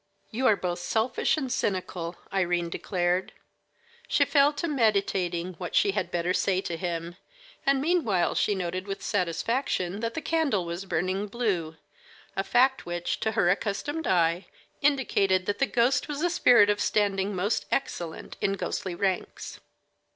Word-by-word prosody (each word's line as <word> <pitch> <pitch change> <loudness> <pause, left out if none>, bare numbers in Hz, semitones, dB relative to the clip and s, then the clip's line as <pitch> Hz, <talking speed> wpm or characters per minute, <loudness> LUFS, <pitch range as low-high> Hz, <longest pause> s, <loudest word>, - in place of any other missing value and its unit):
"You 255 +4 +1
are 215 - +6
both 175 -2 -3
selfish 220 - 0
and 265 -4 -3
cynical," 185 -6 -2 0.2
Irene 175 -3 0
declared. 180 0 -1 0.7
She - - +3
fell 285 0 +4
to 290 +4 -3
meditating 195 - 0
what 180 -2 -5
she 200 - +4
had 190 -3 -2
better 175 +1 0
say 190 0 +1
to 175 -3 -4
him, 170 0 -4 0.5
and 275 -1 +4
meanwhile 275 - +1
she 205 - +1
noted 185 +1 -3
with 195 0 -5
satisfaction 185 - -1
that 230 +1 -3
the - - -1
candle 300 - 0
was 170 +3 -5
burning 190 +2 -1
blue, 195 -8 -2 0.6
a 195 - 0
fact 260 +5 +3
which, 175 0 -2
to 220 0 -1
her 175 -4 +3
accustomed 230 - -2
eye, 170 0 +2 0.3
indicated 200 -10 +2
that 205 - -2
the 275 - +3
ghost 240 +3 +2
was 295 +1 -3
a 350 - +2
spirit 240 - +6
of 205 - -1
standing 200 -1 +1
most 200 +5 -1
excellent 170 -11 -3
in 195 - +1
ghostly 185 -2 -3
ranks. 190 0 -3
195 Hz, 155 wpm, -27 LUFS, 180-240 Hz, 0.7 s, are